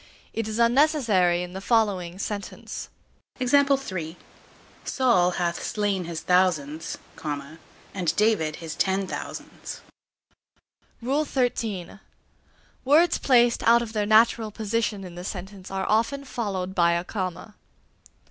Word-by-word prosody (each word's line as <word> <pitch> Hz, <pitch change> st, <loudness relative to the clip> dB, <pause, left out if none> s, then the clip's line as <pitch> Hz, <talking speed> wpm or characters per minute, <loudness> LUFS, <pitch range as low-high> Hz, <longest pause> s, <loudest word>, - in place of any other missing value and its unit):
It 225 Hz, -1 st, -2 dB
is 215 Hz, 0 st, -3 dB
unnecessary 235 Hz, -, +3 dB
in 180 Hz, 0 st, -8 dB
the 190 Hz, -, -6 dB
following 195 Hz, -6 st, +1 dB
sentence: 200 Hz, 0 st, -5 dB, 1.9 s
Saul 235 Hz, -9 st, +3 dB
hath 170 Hz, -1 st, -1 dB
slain 200 Hz, -4 st, -1 dB
his 165 Hz, -1 st, -5 dB
thousands, 165 Hz, -4 st, +1 dB, 0.3 s
and 155 Hz, +4 st, -5 dB
David 210 Hz, -8 st, +2 dB
his 160 Hz, -2 st, -7 dB
ten 190 Hz, +3 st, 0 dB
thousands. -, -, -7 dB, 1.2 s
XIII. 245 Hz, -, -1 dB, 0.8 s
Words 315 Hz, +6 st, +4 dB
placed 240 Hz, -3 st, +4 dB
out 235 Hz, +1 st, +5 dB
of 225 Hz, -1 st, -8 dB
their 210 Hz, -2 st, 0 dB
natural 220 Hz, +1 st, +4 dB
position 215 Hz, -1 st, -2 dB
in 180 Hz, -2 st, -9 dB
the 175 Hz, +1 st, -8 dB
sentence 190 Hz, 0 st, -7 dB
are 190 Hz, 0 st, -2 dB
often 230 Hz, +6 st, +1 dB
followed 195 Hz, -7 st, -3 dB
by 170 Hz, -2 st, +3 dB
a 170 Hz, 0 st, 0 dB
comma. 185 Hz, +2 st, -5 dB
200 Hz, 110 wpm, -25 LUFS, 180-230 Hz, 1.9 s, out